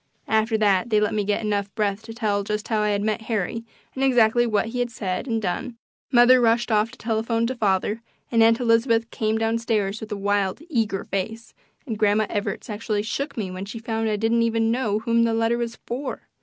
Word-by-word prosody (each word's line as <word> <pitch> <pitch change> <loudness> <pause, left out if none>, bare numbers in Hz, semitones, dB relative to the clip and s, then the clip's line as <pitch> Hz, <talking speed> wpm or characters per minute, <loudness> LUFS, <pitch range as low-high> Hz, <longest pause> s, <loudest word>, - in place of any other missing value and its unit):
After 220 +1 +2
they 215 - +1
had 200 +4 +2
let 210 -1 +2
me 210 -1 0
get 205 +2 -1
enough 205 -2 -1
breath 205 -1 0
to 225 - -8
tell 210 -3 0
just 210 +1 -3
how 220 -2 +1
I 210 - +1
had 205 0 0
met 215 +1 -1
Harry 225 +1 -1 0.3
and 265 - -2
exactly 240 -2 +4
what 220 0 0
he 245 +2 -4
had 245 0 0
said 205 0 -4
and 225 -2 0
done, 230 +5 -3 0.3
mother 250 0 +6
rushed 235 0 +2
off 215 +1 +3
to - - -14
telephone 225 +1 0
to 250 - -1
father, 210 -1 0 0.3
and 230 -1 +3
Aunt 225 0 +5
Elizabeth 230 -1 +2
came 220 0 0
down 225 +1 0
stairs 215 -3 -1
with 220 - -8
a 210 - -2
wild, 200 0 0
eager 220 -7 0
face, 220 +4 -4 0.3
and 225 -6 -4
Grandma 215 0 +3
Evarts 205 -1 -3
actually 210 -1 -2
shook 240 +8 -4
me 195 -5 -3
when 185 +1 -6
she 210 +3 -7
found 225 -1 -2
I 215 - +1
didn't 225 +2 +1
even 225 -1 +1
know 230 -4 0
whom 230 +1 +1
the 230 -1 +1
letter 230 +1 +1
was 235 -1 -3
for. 260 +3 -5
225 Hz, 220 wpm, -24 LUFS, 210-230 Hz, 0.3 s, mother